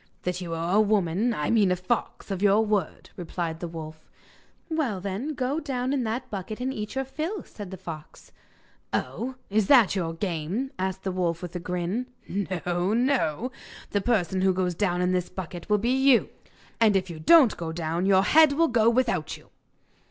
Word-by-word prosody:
'That 180 0 -2
you 175 -2 -5
are 170 +4 0
a - - +7
woman 205 +1 +1
I 150 -10 -1
mean 210 -5 +4
a - - +3
fox 190 +3 -3
of 190 -1 -3
your 205 +2 +4
word,' 205 -6 -2
replied 170 -2 -4
the 175 - -4
wolf. 160 -1 -9 0.6
'Well, 300 - -1
then, 200 +11 -4
go 265 +4 -1
down 265 -3 -2
in 270 -3 0
that 225 +3 -3
bucket 205 +2 -5
and 260 +2 -2
eat 210 0 -5
your 270 0 -1
fill,' 320 +9 -4
said 205 -3 -9
the 190 - -7
fox. 160 -4 -10 0.6
'Oh, 260 +2 -3 0.2
is 210 -1 +2
that 240 -8 +6
your 165 -3 -2
game?' 185 - -2
asked 190 0 -2
the 190 - -1
wolf, 175 -2 -1
with 175 0 -7
a - - -2
grin. 180 +7 -2 0.2
'No! 180 0 -1
no! 245 - +1 0.4
The 205 - +1
person 190 -5 +1
who 190 0 +3
goes 180 -1 0
down 180 0 0
in 180 - +2
the 180 0 +2
bucket 175 0 -7
will 210 - +4
be 235 +4 0
you! 265 -2 +4 0.5
And 220 -3 +4
if 185 -2 0
you 160 - -8
don't 265 - +6
go 165 -1 -5
down 165 +2 -2
your 190 -1 +5
head 305 +6 +6
will 330 +2 +3
go 230 -2 +4
without 230 -10 0
you! - - -21
195 Hz, 195 wpm, -26 LUFS, 175-240 Hz, 0.6 s, a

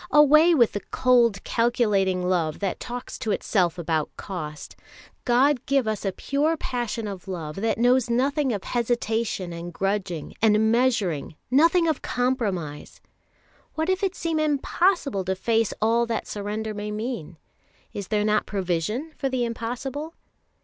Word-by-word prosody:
Away 305 +3 +6
with 235 -6 +4
the 205 - -3
cold, 235 -5 +3
calculating 205 -6 +1
love 165 -4 0
that 195 -2 -2
talks 245 +1 -6
to 220 - -3
itself 180 -4 +1
about 160 -3 -1
cost! 155 -6 -7 0.5
God 255 +2 +3
give 275 -4 +2
us 215 -2 -2
a 195 - 0
pure 295 - 0
passion 235 -5 -3
of 195 -3 -7
love 165 -4 -5
that 225 +3 0
knows 245 +1 +3
nothing 270 +3 +1
of 205 -4 -3
hesitation 225 -6 -1
and 170 +1 -6
grudging, 195 -3 -2
and 220 0 +4
measuring, 220 - +1 0.2
nothing 330 +5 +4
of 315 - 0
compromise! 205 - -2 0.8
What 320 +2 -1
if 375 +2 -1
it 385 -2 0
seem 330 -2 -1
impossible 305 - +1
to 190 +1 0
face 225 +2 +1
all 230 +2 +2
that 230 -1 -2
surrender 215 +1 -4
may 210 0 -5
mean? 210 - -5 0.6
Is 200 -2 -5
there 210 -1 +1
not 215 0 +1
provision 205 - -2
for 270 - -1
the 255 -2 0
impossible? 250 +7 -5
225 Hz, 150 wpm, -25 LUFS, 195-260 Hz, 0.8 s, Away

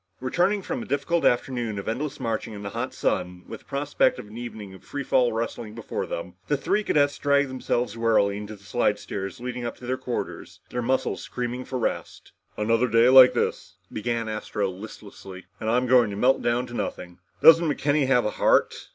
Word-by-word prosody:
Returning 180 +10 +1
from 260 +4 -3
a - - -8
difficult 165 +4 0
afternoon 120 -3 0
of 100 - -6
endless 135 +6 -3
marching 115 -3 -3
in 100 - -8
the 100 - -5
hot 120 +4 -3
sun 90 -1 -2
with - - -8
the - - -26
prospect 140 -1 +1
of - - -8
an 105 - -12
evening 110 -5 -8
of 95 - -14
free 140 -1 -5
fall 125 -2 +2
wrestling 110 -1 -4
before 115 - -4
them, - - -5
the - - +1
three 210 - 0
cadets 145 -6 +2
dragged 140 -1 +2
themselves 125 -3 -2
wearily 110 -3 +2
onto 105 +1 -7
the 100 - -19
slidestairs 105 -3 -2
leading 125 0 -5
to 125 - -13
their 130 +1 -1
quarters, 125 -1 -5
their 125 - -2
muscles 130 +2 0
screaming 125 +1 -4
for 130 - -4
rest. 120 - -4 0.3
"Another 115 +3 +2
day 115 +2 +5
like 130 -1 +9
this," - - -2 0.2
began 115 +1 -2
Astro 110 -2 -2
listlessly, 95 -1 -11
"and 110 - -2
I'm 125 +2 +2
going 125 -3 +5
to 100 - -5
melt 125 +6 +3
down 120 +1 0
to 120 - -11
nothing. 90 -6 -5 0.2
Doesn't 165 0 +8
McKenny 145 -1 +1
have 125 -4 +3
a 105 - 0
heart?" - - +1
120 Hz, 195 wpm, -25 LUFS, 105-130 Hz, 0.3 s, like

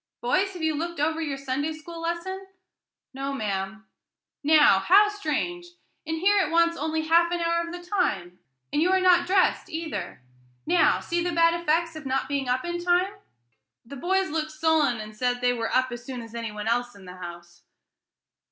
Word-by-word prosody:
Boys, 370 +11 +1
have 350 -3 -7
you 315 0 +2
looked 335 +1 -4
over 315 +2 0
your 290 -4 -3
Sunday 275 +3 -2
school 330 +2 -9
lesson?" 365 +3 -4 0.7
"No, 275 +1 -4
ma'am." 205 -3 -4 0.6
"Now, 295 -9 +6
how 400 - +5
strange! 350 -2 -3 0.4
and 320 0 -2
here 400 +4 +3
it 300 - -2
wants 335 +1 +3
only 315 0 -2
half 340 +2 +3
an 350 - -1
hour 335 0 +1
of - - -7
the 350 0 -8
time, 190 - -1 0.3
and 295 - +2
you 350 - +3
are 380 - +4
not 365 -2 +4
dressed 380 0 +2
either. 315 - -5 0.4
Now, 355 - +3
see 345 0 -1
the 350 - -1
bad 335 0 +4
effects 335 0 0
of 310 -3 -7
not 265 0 -1
being 275 -2 -2
up 255 +3 0
in 345 0 -3
time." 360 +2 +2 0.7
The 280 - -9
boys 375 +5 0
looked 310 0 -2
sullen, 310 -5 +1
and 215 0 -8
said 245 +2 0
"they 245 0 +2
were 230 -2 -3
up 255 0 +2
as 240 0 -7
soon 250 -2 -6
as 230 0 -12
any 230 -2 -4
one 210 +1 -6
else 245 +1 0
in 195 -2 -14
the 180 0 -10
house." 175 -1 -10
315 Hz, 195 wpm, -26 LUFS, 245-345 Hz, 0.7 s, Now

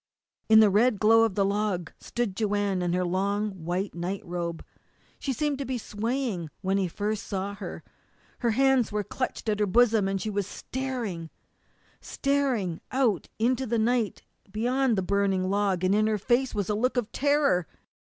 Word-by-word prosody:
In 220 0 +8
the 210 -2 +5
red 215 +1 +3
glow 225 +1 +6
of 215 -4 -2
the 200 - +2
log 200 -4 -1
stood 240 -5 -3
Joanne 205 -3 0
in 175 -1 0
her 180 0 +1
long 200 +4 0
white 185 +2 -3
night 180 +4 -4
robe. 170 -1 -4 0.5
She 275 - -2
seemed 290 +1 -1
to - - -1
be 255 0 -2
swaying 220 - -3
when 195 +1 +1
he 190 - +1
first 210 +4 -2
saw 200 0 -3
her. 200 - -7 0.6
Her 240 - +1
hands 265 0 +3
were 210 0 -1
clutched 255 +3 -4
at 210 -1 0
her 210 - +2
bosom, 220 -1 +4
and 195 0 -1
she 215 - -3
was 200 -1 -1
staring 235 -11 -4 0.7
staring 265 - -1
out 245 -9 +1
into 255 +3 +1
the 235 +1 0
night 230 -1 0 0.3
beyond 245 +2 +1
the 190 - +1
burning 195 -1 +1
log, 200 -3 +1
and 185 +1 +3
in 215 +1 +3
her 215 -1 +1
face 245 +5 +1
was 205 -2 -1
a 210 - 0
look 250 +5 0
of 235 -2 -1
terror. 285 - +2
210 Hz, 180 wpm, -27 LUFS, 190-240 Hz, 0.7 s, In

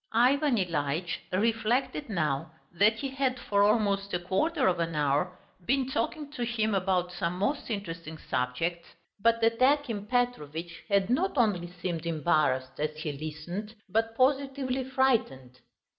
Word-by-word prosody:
Ivan 265 +4 +4
Ilyitch 165 -2 -1
reflected 230 +7 0
now 160 -4 -1 0.2
that 205 +5 +4
he 275 +5 -4
had 265 -1 0
for 200 -4 +1
almost 200 -2 +2
a - - 0
quarter 260 - +1
of 180 -2 +2
an 165 -1 -1
hour 150 +5 +1 0.3
been 265 0 +1
talking 285 +5 -2
to 290 -5 -3
him 220 -2 0
about 185 -2 +1
some 175 0 -2
most 230 +11 -1
interesting 165 -7 -5
subject, 160 +8 -2 0.4
but 230 +2 +3
that 230 +1 +2
Akim 255 -7 +2
Petrovitch 170 - -2
had 200 +1 +2
not 345 +6 +1
only 205 -8 +2
seemed 170 -2 -4
embarrassed 155 -5 +1
as 155 0 -1
he 155 -1 -3
listened, 155 +9 -6
but 225 +3 0
positively 265 -1 +1
frightened. 225 - 0
200 Hz, 145 wpm, -29 LUFS, 165-245 Hz, 0.4 s, Ivan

